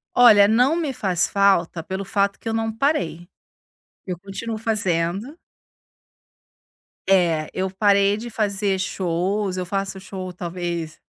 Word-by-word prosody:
Olha, 215 Hz, -5 st, +7 dB
não 250 Hz, +8 st, +3 dB
me 310 Hz, -6 st, -2 dB
faz 190 Hz, -8 st, 0 dB
falta 195 Hz, -4 st, +2 dB
pelo 190 Hz, +3 st, -5 dB
fato 200 Hz, 0 st, 0 dB
que -, -, -9 dB
eu 225 Hz, -, -1 dB
não 225 Hz, 0 st, -1 dB
parei, 175 Hz, -, -1 dB, 0.8 s
eu 180 Hz, -2 st, -5 dB
continuo 210 Hz, +4 st, -5 dB
fazendo 205 Hz, -, -1 dB, 1.7 s
É, 170 Hz, -5 st, +3 dB
eu 190 Hz, 0 st, -1 dB
parei 200 Hz, +1 st, +3 dB
de 235 Hz, +3 st, -6 dB
fazer 200 Hz, -3 st, -1 dB
shows, 185 Hz, +2 st, -1 dB
eu 180 Hz, -, -2 dB
faço 195 Hz, +1 st, -3 dB
show 185 Hz, -1 st, -7 dB
talvez 175 Hz, -2 st, -5 dB
195 Hz, 130 wpm, -22 LUFS, 180-215 Hz, 1.7 s, Olha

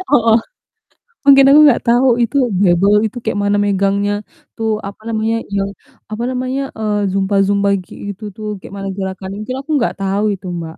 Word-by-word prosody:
i -, -, -4 dB
heeh. 230 Hz, -5 st, +4 dB, 0.9 s
Mungkin 275 Hz, -1 st, +7 dB
aku 295 Hz, +2 st, +7 dB
enggak 280 Hz, -5 st, +4 dB
tahu 240 Hz, +3 st, +4 dB, 0.2 s
itu 235 Hz, +4 st, -1 dB, 0.2 s
barbel 195 Hz, +1 st, +4 dB
itu 220 Hz, -, -8 dB
kayak 220 Hz, -, -1 dB
mana 205 Hz, 0 st, +2 dB
megangnya, 200 Hz, +1 st, +1 dB, 0.4 s
tuh 225 Hz, -1 st, -1 dB, 0.2 s
apa 200 Hz, -, -12 dB
namanya 225 Hz, 0 st, -1 dB, 0.2 s
yang, 195 Hz, 0 st, 0 dB, 0.4 s
apa 215 Hz, +2 st, -4 dB
namanya, 255 Hz, +1 st, -2 dB, 0.2 s
eee, 210 Hz, -2 st, 0 dB
zumba-zumba 195 Hz, +1 st, +1 dB, 0.2 s
kayak -, -, -13 dB
gitu 200 Hz, +2 st, -7 dB
tuh, 215 Hz, -, -7 dB
kayak -, -, -12 dB
mana 195 Hz, 0 st, -5 dB
gerakannya, 190 Hz, 0 st, -5 dB
mungkin 255 Hz, +4 st, -5 dB
aku 275 Hz, -, -11 dB
enggak 240 Hz, -5 st, 0 dB
tahu 195 Hz, +2 st, 0 dB
itu, 190 Hz, 0 st, -11 dB
Mbak. 160 Hz, -1 st, -7 dB
205 Hz, 180 wpm, -16 LUFS, 195-230 Hz, 0.9 s, Mungkin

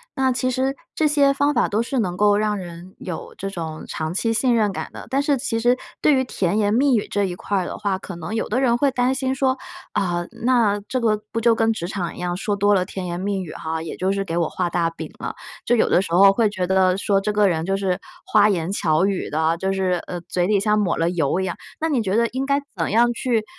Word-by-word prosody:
那 265 Hz, -1 st, +2 dB
其 255 Hz, +1 st, 0 dB
实 260 Hz, +2 st, 0 dB, 0.2 s
这 315 Hz, -, +1 dB
些 285 Hz, -2 st, +4 dB
方 285 Hz, +1 st, +1 dB
法 245 Hz, -, +2 dB
都 215 Hz, +3 st, 0 dB
是 260 Hz, +1 st, -2 dB
能 180 Hz, -5 st, -1 dB
够 205 Hz, +1 st, +4 dB
让 210 Hz, 0 st, 0 dB
人 175 Hz, 0 st, -9 dB
有 180 Hz, -3 st, -7 dB
这 195 Hz, -, -4 dB
种 160 Hz, -4 st, -6 dB
长 155 Hz, +1 st, -3 dB
期 225 Hz, +4 st, 0 dB
信 240 Hz, +2 st, +2 dB
任 210 Hz, -3 st, +2 dB
感 -, -, -5 dB
的， -, -, -9 dB
但 275 Hz, +2 st, +1 dB
是 285 Hz, -1 st, +1 dB
其 240 Hz, -3 st, -2 dB
实 245 Hz, +2 st, +3 dB, 0.2 s
对 300 Hz, -, +5 dB
于 260 Hz, -, +3 dB
甜 200 Hz, -6 st, -1 dB
言 205 Hz, -1 st, +2 dB
蜜 265 Hz, +2 st, +4 dB
语 215 Hz, -, 0 dB
这 205 Hz, -1 st, +1 dB
一 180 Hz, -2 st, -4 dB
块 200 Hz, +2 st, -2 dB
儿 185 Hz, -, 0 dB
的 -, -, -5 dB
话， 200 Hz, -2 st, -1 dB
可 195 Hz, -, -8 dB
能 170 Hz, +5 st, -6 dB
有 225 Hz, -, -1 dB
的 245 Hz, +5 st, 0 dB
人 240 Hz, -3 st, +3 dB
会 280 Hz, +3 st, +3 dB
担 255 Hz, 0 st, +1 dB
心 265 Hz, 0 st, -1 dB
说， 260 Hz, 0 st, +1 dB, 0.3 s
啊， 175 Hz, -2 st, -1 dB
那 230 Hz, -4 st, +2 dB
这 255 Hz, -, -1 dB
个 215 Hz, -2 st, +1 dB
不 230 Hz, -, -2 dB
就 230 Hz, 0 st, +5 dB
跟 225 Hz, 0 st, +2 dB
职 175 Hz, -6 st, -4 dB
场 185 Hz, -3 st, -3 dB
一 -, -, -10 dB
样， 175 Hz, 0 st, -2 dB
说 205 Hz, +2 st, -1 dB
多 205 Hz, +1 st, +3 dB
了 185 Hz, -2 st, +2 dB
甜 190 Hz, 0 st, -6 dB
言 175 Hz, 0 st, -4 dB
蜜 195 Hz, 0 st, -1 dB
语 160 Hz, -, -8 dB
哈， 160 Hz, 0 st, -4 dB
也 165 Hz, -, -6 dB
就 185 Hz, +1 st, 0 dB
是 195 Hz, 0 st, -1 dB
给 170 Hz, -3 st, -3 dB
我 170 Hz, -2 st, +1 dB
画 180 Hz, -2 st, -2 dB
大 170 Hz, -1 st, +1 dB
饼 165 Hz, -, -8 dB
了， -, -, -5 dB, 0.3 s
就 240 Hz, -, +3 dB
有 230 Hz, -, +2 dB
的 -, -, +4 dB
时 170 Hz, -, -5 dB
候 195 Hz, +3 st, +7 dB
会 215 Hz, +2 st, +2 dB
觉 185 Hz, -3 st, -2 dB
得 185 Hz, 0 st, +3 dB
说， 195 Hz, 0 st, +2 dB
这 205 Hz, +2 st, -1 dB
个 205 Hz, -1 st, +4 dB
人 165 Hz, -3 st, 0 dB
就 195 Hz, +2 st, 0 dB
是 190 Hz, -2 st, -1 dB, 0.3 s
花 210 Hz, 0 st, +4 dB
言 175 Hz, -3 st, -1 dB
巧 160 Hz, -3 st, +2 dB
语 195 Hz, -2 st, -1 dB
的， 160 Hz, +2 st, +1 dB
就 190 Hz, +2 st, -1 dB
是， 185 Hz, -2 st, 0 dB
呃， 175 Hz, -1 st, -5 dB
嘴 175 Hz, +1 st, -1 dB
里 205 Hz, -1 st, +3 dB
像 210 Hz, +1 st, +2 dB
抹 195 Hz, -4 st, 0 dB
了 165 Hz, +1 st, +1 dB
油 165 Hz, -1 st, 0 dB
一 -, -, 0 dB
样， 175 Hz, -, -3 dB, 0.3 s
那 320 Hz, -, +1 dB
你 270 Hz, -6 st, +1 dB
觉 195 Hz, -2 st, -1 dB
得 235 Hz, +1 st, +3 dB
应 260 Hz, +2 st, -3 dB
该 280 Hz, 0 st, +2 dB, 0.2 s
怎 165 Hz, -3 st, -1 dB
样 240 Hz, +3 st, +4 dB
去， 235 Hz, -2 st, 0 dB
200 Hz, 290 characters per minute, -22 LUFS, 180-235 Hz, 0.3 s, 候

